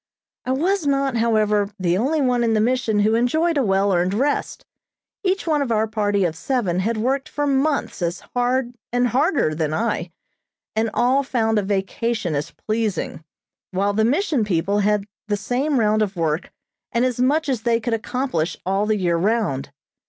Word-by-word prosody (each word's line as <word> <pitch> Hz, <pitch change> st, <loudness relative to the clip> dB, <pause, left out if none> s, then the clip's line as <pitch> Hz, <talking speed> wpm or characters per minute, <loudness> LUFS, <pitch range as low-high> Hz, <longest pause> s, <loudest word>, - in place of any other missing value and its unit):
I 255 Hz, -, -1 dB
was 335 Hz, +5 st, +1 dB
not, 275 Hz, -3 st, +1 dB
however, 215 Hz, -3 st, +2 dB
the 175 Hz, -1 st, +1 dB
only 280 Hz, +10 st, +1 dB
one 250 Hz, -2 st, +2 dB
in 225 Hz, -1 st, +2 dB
the -, -, +3 dB
Mission 225 Hz, -2 st, +1 dB
who 215 Hz, +2 st, +3 dB
enjoyed 315 Hz, +9 st, +2 dB
a 285 Hz, -, +2 dB
well 195 Hz, -1 st, +2 dB
earned 180 Hz, +2 st, +1 dB
rest. 280 Hz, +6 st, -1 dB, 0.6 s
Each 385 Hz, 0 st, 0 dB
one 305 Hz, -3 st, +1 dB
of 265 Hz, -4 st, -1 dB
our 220 Hz, -1 st, +2 dB
party 205 Hz, -3 st, 0 dB
of 165 Hz, -2 st, -1 dB
seven 190 Hz, -3 st, -1 dB
had 220 Hz, +4 st, 0 dB
worked 265 Hz, +5 st, -1 dB
for 290 Hz, -, -2 dB
months 280 Hz, -4 st, 0 dB
as 170 Hz, +1 st, -2 dB
hard 245 Hz, 0 st, 0 dB, 0.2 s
and 245 Hz, 0 st, +2 dB
harder 275 Hz, -, +2 dB
than 155 Hz, -1 st, -1 dB
I, 210 Hz, -5 st, -1 dB, 0.7 s
and 220 Hz, +1 st, +1 dB
all 255 Hz, +3 st, +3 dB
found 225 Hz, -5 st, +1 dB
a -, -, +1 dB
vacation 200 Hz, 0 st, -1 dB
as 145 Hz, 0 st, -2 dB
pleasing, 215 Hz, -7 st, -3 dB, 0.5 s
while 200 Hz, +2 st, 0 dB
the 220 Hz, +2 st, +2 dB
Mission 285 Hz, -, +1 dB
people 200 Hz, +1 st, 0 dB
had 205 Hz, 0 st, +1 dB, 0.2 s
the 205 Hz, -1 st, 0 dB
same 250 Hz, +7 st, 0 dB
round 215 Hz, -1 st, +2 dB
of 205 Hz, -2 st, -1 dB
work 160 Hz, -1 st, -1 dB, 0.4 s
and 235 Hz, +1 st, +2 dB
as 250 Hz, -2 st, -1 dB
much 295 Hz, +5 st, +2 dB
as 255 Hz, -5 st, -1 dB
they 230 Hz, 0 st, +2 dB
could 235 Hz, 0 st, -2 dB
accomplish 225 Hz, -, -2 dB
all 195 Hz, +3 st, +1 dB
the 215 Hz, -1 st, +2 dB
year 175 Hz, -3 st, +1 dB
round. 185 Hz, -, 0 dB
225 Hz, 180 wpm, -22 LUFS, 200-260 Hz, 0.7 s, the